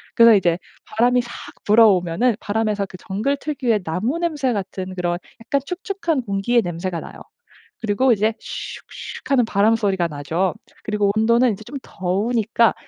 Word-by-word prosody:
그래서 230 -1 +8
이제 175 -4 +2 0.3
바람이 245 +3 +2
삭 235 0 -10 0.3
불어오면은 210 0 +4
바람에서 210 -1 -1
그 185 - -11
정글 220 +9 -2
특유의 255 -9 -1
나무 185 - -1
냄새 300 -7 0
같은 190 -2 -4
그런 175 -1 -1 0.3
약간 275 +4 +1
축축한 360 - -2
공기의 215 +3 +1
냄새가 175 0 -3
나요. - - -10 0.6
그리고 230 +4 +3
이제 215 +1 +1
"슉 - - -37 0.9
슉." - - -12
하는 260 -4 +4
바람 215 +1 +3
소리가 195 -6 +1
나죠. 160 +4 -1 0.3
그리고 210 -1 +1
온도는 235 +3 +4
이제 205 - -9
좀 265 - -9
더우니까 220 +5 +1
215 Hz, 345 characters per minute, -21 LUFS, 190-245 Hz, 0.9 s, 그래서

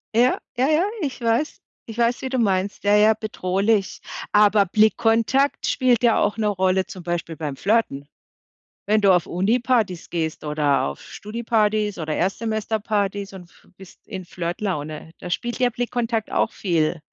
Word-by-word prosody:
Ja, 245 +2 +4 0.2
ja, 260 +2 +3
ja, 310 +3 +3 0.2
ich 270 -4 -4
weiß. 230 +6 0 0.2
Ich 225 - -9
weiß, 235 +1 +1
wie 260 - -2
du 260 - -1
meinst. 195 -2 0
Ja, 205 +1 +4
ja, 215 +1 +6
bedrohlich. 200 0 -1 0.3
Aber 210 -1 +5
Blickkontakt 225 +6 +2
spielt 250 -3 +2
ja 230 -2 +4
auch 205 +2 0
'ne 215 -1 0
Rolle 190 -1 +1
zum 190 -5 -9
Beispiel 170 -1 -3
beim 150 -4 -4
Flirten. 180 - 0 0.8
Wenn 215 0 +3
du 195 -1 +5
auf 180 - +1
Unipartys 215 -1 0
gehst 160 -2 -3
oder 150 -2 +1
auf 70 0 -5
Studipartys 215 -2 -1
oder 155 -1 -2
Erstsemesterpartys 205 -1 -1
und 180 -2 -11 0.3
bist 190 -2 -16
in 185 -2 -7
Flirtlaune. 170 -3 -4
Da 180 - -7
spielt 240 +7 -3
der 250 -1 +3
Blickkontakt 235 -2 -2
auch - - +1
viel 165 -3 0
205 Hz, 155 wpm, -22 LUFS, 180-230 Hz, 0.8 s, ja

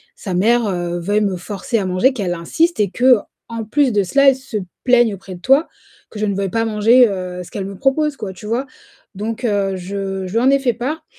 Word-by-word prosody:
sa 190 - -6
mère 230 +5 +3 0.4
veuille 205 +4 +1
me 195 -3 0
forcer 205 +5 -3
à 195 - -2
manger, 185 +9 +2
qu'elle 190 -7 -2
insiste 320 - 0
et 200 - +1
qu'en 230 -2 +1
plus 275 +2 +2
de 205 -1 +2
cela, 275 +8 +4
elle 265 - +2
se 260 -4 -6 0.3
plaigne 240 -4 +4
auprès 190 -1 -10
de - - -12
toi, 275 +5 +3 0.4
que 210 - -9
je 215 - 0
ne 200 -2 -1
veuille 195 -1 -1
pas 225 +4 0
manger, 225 +3 +5
heu, 180 -2 -5
ce - - -13
qu'elle 195 -2 -4
me 195 0 -7
propose, 280 +2 +1
quoi, 190 -3 -6
tu 200 +4 -12
vois? 245 +5 -1 0.5
Donc 225 +4 -4
heu, 200 -3 0
je 195 0 -4
je - - -8
lui 230 - +2
en 260 +2 +3
ai 275 0 +4
fait 250 -3 +1
part. 295 +7 -4
215 Hz, 230 wpm, -18 LUFS, 195-255 Hz, 0.5 s, manger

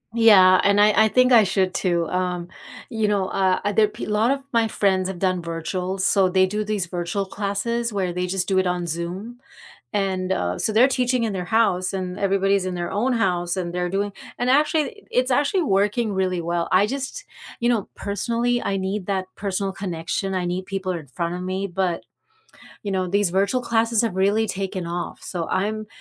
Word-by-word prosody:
Yeah, 195 -5 +7
and 200 +1 +4
I 210 +1 +5
I - - +4
think 255 +3 +3
I 230 -3 +8
should 190 -1 0
too, 175 -3 0
um 180 -1 -2 0.4
you 220 -4 0
know, 200 -2 +1
uh, 190 -1 +1
other 205 +1 +3
pe 215 +3 -7
lot 215 +2 +1
of 275 0 -1
my 230 -3 +2
friends 190 -3 +1
have 190 -2 -6
done 185 -1 0
virtual, 180 +3 -4
so 190 0 +3
they 185 +1 +3
do 210 +3 -2
these 210 -3 -1
virtual 175 +3 -3
classes 210 +4 -2
where 190 -3 -1
they 180 +1 -2
just 185 0 -1
do 190 - +1
it 190 -1 +2
on 180 -1 -1
Zoom, 180 +9 -5 0.5
and, 190 -2 -1
uh, 90 - -1
so 215 - 0
they're 230 +4 +6
teaching 250 -2 +1
in 220 - -1
their 180 -1 -3
house, 185 -4 +2
and 185 -1 -4
everybody's 195 0 +2
in 185 -1 -3
their 175 0 -3
own 235 +6 0
house, 180 -5 0
and 175 -2 -3
they're 180 0 -1
doing 200 +2 -1 0.3
and 245 - -1
actually 305 - +1
it's 255 +1 +1
actually 295 +8 +2
working 210 -2 +1
really 185 -2 0
well. 170 0 -2
I 190 +2 +4
just 275 - -5 0.3
you 240 - 0
know, 230 -5 0
personally 235 +4 -1
I 195 - -1
need 190 0 -3
that 190 -2 -1
personal 195 -1 -2
connection, 190 0 -3
I 185 -1 -1
need 180 +1 -3
people 195 -1 -3
in 165 -5 -7
front 170 +6 -3
of 180 - -5
me, 185 +2 -2
but, 180 -2 -2 0.8
you 205 - -3
know, 185 -1 0
these 200 0 +1
virtual 200 +7 +1
classes 230 -1 +1
have 220 -5 -1
really 200 +4 +2
taken 190 -2 -3
off, 175 +1 -5
so 170 -3 -4
I'm 215 +3 -1
195 Hz, 200 wpm, -23 LUFS, 185-215 Hz, 0.8 s, I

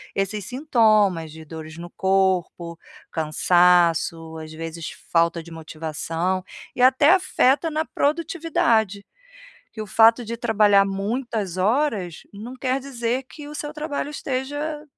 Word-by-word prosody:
esses 195 0 -2
sintomas 215 - +2
de 160 0 -11
dores 155 0 -9
no 175 +1 -9
corpo, 185 -3 0 0.3
cansaço, 165 0 +2
às 155 0 -9
vezes, 165 0 -6 0.2
falta 170 0 +2
de 170 - -13
motivação 165 +3 -3 0.3
e 245 - -2
até 265 +4 +5
afeta 325 -4 +2
na 310 +1 0
produtividade, 285 - 0 0.7
que 220 - -12
o 215 - -3
fato 225 +3 +4
de 230 +2 -4
trabalhar 210 -4 +4
muitas 200 -1 -3
horas 210 - 0
não 230 +6 -8
quer 260 +1 -1
dizer 255 -1 -3
que 295 -2 -10
o 300 - -9
seu 295 0 -5
trabalho 300 -1 -4
esteja, 290 +2 -4
210 Hz, 130 wpm, -23 LUFS, 170-265 Hz, 0.7 s, até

